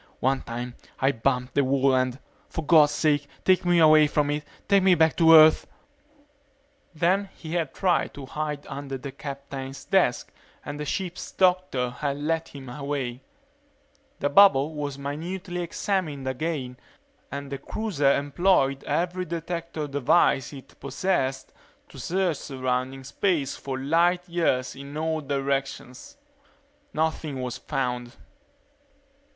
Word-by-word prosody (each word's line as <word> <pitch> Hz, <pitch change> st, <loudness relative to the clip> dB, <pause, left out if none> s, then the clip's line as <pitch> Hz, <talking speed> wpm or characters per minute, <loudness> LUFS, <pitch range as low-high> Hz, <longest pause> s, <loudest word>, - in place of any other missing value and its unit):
One 135 Hz, +1 st, +1 dB
time 120 Hz, +1 st, -6 dB, 0.3 s
I 135 Hz, +1 st, +3 dB
bumped 125 Hz, +1 st, -1 dB
the 140 Hz, -, +3 dB
wall 135 Hz, 0 st, +2 dB
and 130 Hz, -1 st, +1 dB, 0.3 s
for 160 Hz, -, -5 dB
God's 150 Hz, -2 st, +6 dB
sake 145 Hz, -2 st, +1 dB, 0.2 s
take 185 Hz, -1 st, +4 dB
me 175 Hz, 0 st, +3 dB
away 155 Hz, -2 st, +7 dB
from 145 Hz, 0 st, +1 dB
it 150 Hz, 0 st, -2 dB, 0.2 s
take 200 Hz, -1 st, +5 dB
me 185 Hz, -1 st, +5 dB
back 160 Hz, -1 st, +3 dB
to 165 Hz, -1 st, +7 dB
Earth 155 Hz, 0 st, +7 dB, 0.6 s
..." 280 Hz, -, -39 dB
Then 190 Hz, +5 st, +1 dB
he 160 Hz, 0 st, -8 dB
had 165 Hz, -5 st, -1 dB
tried 185 Hz, -3 st, 0 dB
to 140 Hz, -, -8 dB
hide 150 Hz, +1 st, -4 dB
under 135 Hz, -1 st, -6 dB
the 135 Hz, +1 st, -7 dB
captain's 135 Hz, -1 st, -7 dB
desk -, -, +1 dB, 0.3 s
and 145 Hz, 0 st, -6 dB
the 150 Hz, -, -3 dB
ship's 180 Hz, +4 st, -4 dB
doctor 180 Hz, -9 st, +1 dB
had 140 Hz, +2 st, -3 dB
led 160 Hz, +2 st, -1 dB
him 135 Hz, -2 st, -11 dB
away. 135 Hz, -2 st, -4 dB, 1.0 s
The 145 Hz, -, 0 dB
bubble 150 Hz, -3 st, +6 dB
was 145 Hz, -2 st, -4 dB
minutely 175 Hz, +6 st, -5 dB
examined 170 Hz, -5 st, -2 dB
again 130 Hz, -2 st, -3 dB, 0.5 s
and 140 Hz, 0 st, -6 dB
the 140 Hz, -, -4 dB
cruiser 150 Hz, -6 st, 0 dB
employed 140 Hz, -1 st, +2 dB
every 175 Hz, +4 st, -1 dB
detector 170 Hz, -2 st, -4 dB
device 140 Hz, 0 st, +2 dB
it 135 Hz, -3 st, -13 dB
possessed 135 Hz, -1 st, -2 dB, 0.4 s
to -, -, -12 dB
search 180 Hz, -3 st, 0 dB
surrounding 130 Hz, -1 st, -3 dB
space 150 Hz, 0 st, -1 dB
for 135 Hz, -1 st, -5 dB
light 170 Hz, +6 st, +2 dB
years 165 Hz, -7 st, 0 dB
in 140 Hz, +2 st, -8 dB
all 160 Hz, 0 st, -1 dB
directions. 135 Hz, -, -3 dB, 0.7 s
Nothing 155 Hz, -, -2 dB
was 125 Hz, 0 st, -4 dB
found. 125 Hz, -2 st, -3 dB
145 Hz, 135 wpm, -25 LUFS, 135-170 Hz, 1.0 s, away